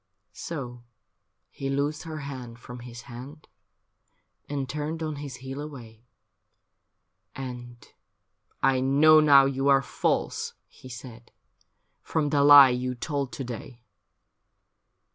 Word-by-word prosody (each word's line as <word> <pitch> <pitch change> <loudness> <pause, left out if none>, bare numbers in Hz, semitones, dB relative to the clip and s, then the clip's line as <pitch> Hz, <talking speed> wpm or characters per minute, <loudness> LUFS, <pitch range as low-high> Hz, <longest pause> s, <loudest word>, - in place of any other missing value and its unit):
So 125 -7 -6 0.7
he 135 - -5
loosed 145 +3 -1
her 155 -1 -6
hand 130 -4 -8
from 125 0 -10
his 120 -1 -10
hand, 135 +5 -11 1.0
And 140 -2 -3
turned 150 +4 -4
on 155 -2 -4
his 140 -3 -7
heel 135 +2 -5
away. 120 -6 -11 1.3
And, 125 -2 -7 0.5
* - - -44
I 130 - 0
know 145 +4 +6
now 140 -3 +7
you 135 0 -1
are 135 -1 +5
false,' - - -1
he 130 - -15
said, 120 -1 -11 0.7
'From 155 -3 -1
the 145 -2 +3
lie 145 -2 +10
you 125 0 -2
told 140 +1 -3
to 135 - -5
day.' 120 0 -8
135 Hz, 125 wpm, -26 LUFS, 125-145 Hz, 1.3 s, lie